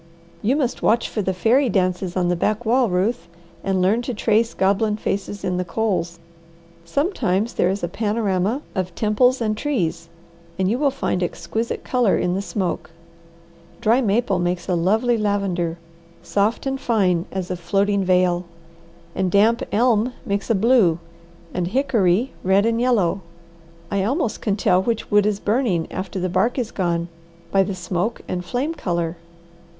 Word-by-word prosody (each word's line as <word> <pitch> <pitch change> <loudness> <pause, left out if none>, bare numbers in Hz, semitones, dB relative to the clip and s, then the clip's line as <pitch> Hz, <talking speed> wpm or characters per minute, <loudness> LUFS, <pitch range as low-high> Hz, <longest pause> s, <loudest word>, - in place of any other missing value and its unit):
You 240 +6 +2
must 270 -5 -1
watch 230 +2 +2
for 215 - -3
the 190 - 0
fairy 235 +8 +2
dances 185 -2 0
on 180 -1 +2
the 175 - +2
backwall, 230 +6 +1
Ruth, 190 +6 0 0.4
and 190 -1 +1
learn 210 +6 +3
to 245 0 -4
trace 225 +2 +1
goblin 210 +2 +1
faces 200 -1 -3
in 180 -1 -1
the 180 - 0
coals. 180 -4 -1 0.7
Sometimes 220 - 0
there 180 - +2
is 195 0 -2
a - - +1
panorama 210 - -1
of 185 -2 -3
temples 245 +4 +2
and 215 -1 0
trees, 175 - -2 0.5
and 190 - +1
you 230 +6 0
will 285 -1 +3
find 265 -8 -2
exquisite 220 +5 -3
colour 245 -5 +2
in 180 - 0
the 195 - -1
smoke. 195 -5 -3 0.9
Dry 235 +2 +3
maple 210 -3 +1
makes 175 0 -1
a 185 - 0
lovely 220 +7 +2
lavender, 195 -5 -1 0.5
soft 200 +9 0
and 270 0 -2
fine 185 -7 +1
as 185 -1 -4
a - - -1
floating 195 +3 +1
veil, 180 -1 +2 0.7
and 185 - 0
damp 215 +5 +3
elm 235 +1 +2
makes 200 +2 -2
a 225 - +3
blue, 210 -5 +4 0.6
and 180 -1 -1
hickory 225 -2 +1
red 195 +2 +3
and 230 0 +1
yellow. 200 -7 +2 0.7
I 200 -1 +1
almost 240 - -1
can 205 -3 0
tell 185 -2 +3
which 225 +2 -2
wood 205 0 +4
is 205 -1 0
burning 205 -7 +1
after 190 +1 -4
the 185 - -1
bark 190 +8 +1
is 240 -4 -2
gone, 170 -3 -1 0.4
by 195 - +4
the 195 0 -1
smoke 180 +5 -2
and 180 -1 -3
flame 255 - -2
colour. 170 - -2
200 Hz, 165 wpm, -22 LUFS, 180-230 Hz, 0.9 s, blue